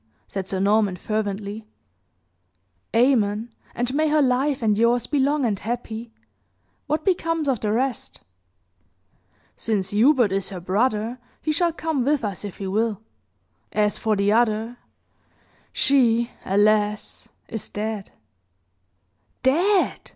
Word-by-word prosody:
said 195 Hz, -1 st, -5 dB
Sir 190 Hz, -, -2 dB
Norman, 205 Hz, -1 st, +2 dB
fervently. 210 Hz, +1 st, -3 dB, 1.3 s
"Amen! 225 Hz, -2 st, +2 dB, 0.2 s
And 245 Hz, +2 st, -1 dB
may 310 Hz, +2 st, +2 dB
her 300 Hz, -1 st, +3 dB
life 265 Hz, +1 st, +1 dB
and 210 Hz, -2 st, +3 dB
yours 235 Hz, +2 st, +2 dB
be 290 Hz, -, 0 dB
long 280 Hz, 0 st, +2 dB
and 205 Hz, -4 st, 0 dB
happy. 230 Hz, 0 st, -5 dB, 0.8 s
What 305 Hz, +1 st, -1 dB
becomes 330 Hz, -5 st, 0 dB
of 260 Hz, -5 st, +1 dB
the 210 Hz, 0 st, -1 dB
rest?" 250 Hz, +3 st, -2 dB, 1.4 s
"Since 200 Hz, -4 st, -2 dB
Hubert 240 Hz, 0 st, +4 dB
is 195 Hz, 0 st, -1 dB
her 190 Hz, -, -6 dB
brother, 215 Hz, +5 st, 0 dB, 0.2 s
he 310 Hz, -, -1 dB
shall 340 Hz, +2 st, +2 dB
come 320 Hz, -5 st, -2 dB
with 285 Hz, 0 st, +1 dB
us, 200 Hz, -2 st, -4 dB
if 205 Hz, -3 st, -7 dB
he 195 Hz, -, -5 dB
will. 210 Hz, +2 st, 0 dB, 0.7 s
As 210 Hz, -1 st, +1 dB
for 220 Hz, -1 st, +1 dB
the 200 Hz, 0 st, +2 dB
other, 225 Hz, +1 st, +1 dB, 0.9 s
she, 235 Hz, -4 st, +3 dB
alas! 210 Hz, +1 st, +1 dB, 0.2 s
is 225 Hz, -, -5 dB
dead." 210 Hz, -1 st, -4 dB, 1.3 s
"Dead!" 355 Hz, +9 st, +2 dB
225 Hz, 125 wpm, -23 LUFS, 205-265 Hz, 1.4 s, Hubert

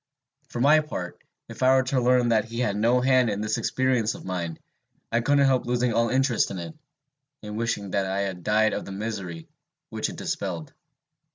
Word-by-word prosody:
For -, -, -5 dB
my 150 Hz, +5 st, +6 dB
part, 120 Hz, -13 st, -6 dB, 0.3 s
if -, -, -10 dB
I 130 Hz, +1 st, +5 dB
were 130 Hz, -, +4 dB
to 130 Hz, 0 st, 0 dB
learn 125 Hz, 0 st, +3 dB
that 110 Hz, -2 st, +2 dB
he 115 Hz, +1 st, -6 dB
had 105 Hz, -5 st, 0 dB
no 120 Hz, +4 st, +3 dB
hand 130 Hz, -2 st, +3 dB
in 100 Hz, -1 st, -2 dB
this 110 Hz, 0 st, -1 dB
experience 125 Hz, -4 st, 0 dB
of -, -, -11 dB
mine, 85 Hz, -3 st, -3 dB, 0.5 s
I 115 Hz, -, +2 dB
couldn't 140 Hz, +2 st, +3 dB
help 130 Hz, -2 st, +2 dB
losing 125 Hz, -1 st, +1 dB
all 115 Hz, 0 st, +2 dB
interest 130 Hz, -1 st, +2 dB
in 95 Hz, -, -5 dB
it, 85 Hz, -, -6 dB, 0.7 s
and 105 Hz, 0 st, -6 dB
wishing 105 Hz, -3 st, -2 dB
that 95 Hz, 0 st, 0 dB
I 95 Hz, +1 st, -1 dB
had 95 Hz, -3 st, -4 dB
died 110 Hz, +3 st, +2 dB
of -, -, -3 dB
the -, -, -8 dB
misery 95 Hz, -5 st, -5 dB, 0.4 s
which -, -, -2 dB
it -, -, -8 dB
dispelled. 155 Hz, -4 st, -4 dB
115 Hz, 200 wpm, -25 LUFS, 100-125 Hz, 0.7 s, my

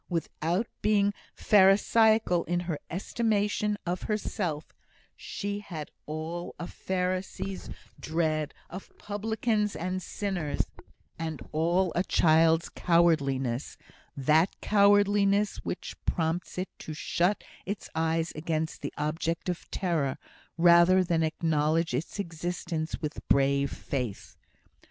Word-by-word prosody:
Without 170 Hz, +3 st, -1 dB, 0.2 s
being 205 Hz, -1 st, +3 dB, 0.2 s
pharisaical 210 Hz, -1 st, +4 dB
in 175 Hz, 0 st, 0 dB
her 170 Hz, -4 st, -3 dB
estimation 210 Hz, +2 st, 0 dB
of 180 Hz, +1 st, -2 dB
herself, 185 Hz, -7 st, -2 dB, 0.4 s
she 205 Hz, 0 st, -4 dB
had 165 Hz, -7 st, -7 dB, 0.2 s
all 160 Hz, +3 st, -5 dB
a 175 Hz, -, -4 dB
Pharisee's 185 Hz, +1 st, -3 dB, 0.3 s
dread 155 Hz, -2 st, -1 dB
of 185 Hz, +3 st, -9 dB
publicans 210 Hz, -1 st, -1 dB
and 185 Hz, +4 st, -2 dB
sinners, 180 Hz, -6 st, -2 dB, 0.5 s
and 160 Hz, -2 st, -3 dB
all 170 Hz, +3 st, +2 dB
a 175 Hz, -, +1 dB
child's 160 Hz, -1 st, +4 dB
cowardliness 140 Hz, -7 st, +1 dB, 0.4 s
that 155 Hz, +6 st, +4 dB
cowardliness 205 Hz, 0 st, +4 dB
which -, -, -5 dB
prompts 165 Hz, +1 st, -1 dB
it 185 Hz, +1 st, -2 dB
to 155 Hz, -, -7 dB
shut 180 Hz, +6 st, 0 dB, 0.2 s
its 200 Hz, +1 st, -4 dB
eyes 160 Hz, +1 st, 0 dB
against 160 Hz, 0 st, -2 dB
the -, -, -4 dB
object 160 Hz, +4 st, -2 dB
of 175 Hz, -, -4 dB
terror, 160 Hz, -8 st, -1 dB, 0.4 s
rather 170 Hz, +2 st, +6 dB
than 170 Hz, -2 st, +1 dB
acknowledge 160 Hz, -1 st, +1 dB
its 140 Hz, +11 st, -3 dB
existence 170 Hz, -3 st, -3 dB
with 150 Hz, -1 st, -3 dB
brave 140 Hz, 0 st, +3 dB
faith. 125 Hz, -7 st, -4 dB
170 Hz, 110 wpm, -28 LUFS, 160-195 Hz, 0.5 s, rather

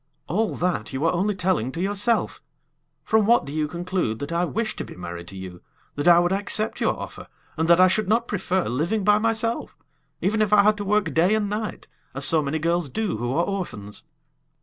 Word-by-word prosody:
"All 215 Hz, +8 st, -1 dB
that 165 Hz, -12 st, -2 dB
you 135 Hz, +4 st, -1 dB
are 165 Hz, -, +3 dB
only 195 Hz, +4 st, 0 dB
telling 180 Hz, -, 0 dB
to -, -, -5 dB
yourself! 205 Hz, +5 st, 0 dB, 0.6 s
From 220 Hz, -2 st, +2 dB
what 235 Hz, +1 st, +4 dB
do 140 Hz, -, -7 dB
you 155 Hz, -1 st, 0 dB
conclude 175 Hz, -, -2 dB
that 140 Hz, +4 st, -6 dB
I 170 Hz, +1 st, +1 dB
wish 220 Hz, +4 st, -2 dB
to -, -, -3 dB
be -, -, -11 dB
married 85 Hz, -1 st, -7 dB
to 95 Hz, -, -9 dB
you; 90 Hz, -2 st, -9 dB, 0.3 s
that 145 Hz, +3 st, -2 dB
I 170 Hz, -1 st, +8 dB
would 175 Hz, +1 st, +3 dB
accept 205 Hz, +2 st, -1 dB
your -, -, +1 dB
offer, -, -, -8 dB, 0.3 s
and 160 Hz, 0 st, 0 dB
that 170 Hz, +1 st, +6 dB
I 185 Hz, -, +8 dB
should 190 Hz, +2 st, 0 dB
not 230 Hz, +2 st, +2 dB
prefer 190 Hz, -2 st, -1 dB
living 170 Hz, -, -1 dB
by 210 Hz, +1 st, +4 dB
myself, 225 Hz, +1 st, -1 dB, 0.4 s
even 215 Hz, +3 st, 0 dB
if 210 Hz, -2 st, +1 dB
I 210 Hz, -1 st, +6 dB
had 210 Hz, 0 st, +3 dB
to 205 Hz, -, -4 dB
work 200 Hz, -4 st, +1 dB
day 180 Hz, +6 st, +3 dB
and 215 Hz, -1 st, 0 dB
night, 210 Hz, -1 st, -4 dB, 0.3 s
as 135 Hz, +1 st, +2 dB
so 160 Hz, +1 st, +4 dB
many 145 Hz, +2 st, -2 dB
girls 170 Hz, -1 st, 0 dB
do 215 Hz, -, -2 dB
who 120 Hz, +2 st, -2 dB
are 170 Hz, -, +2 dB
orphans?" 105 Hz, -, -5 dB
180 Hz, 215 wpm, -24 LUFS, 155-210 Hz, 0.6 s, I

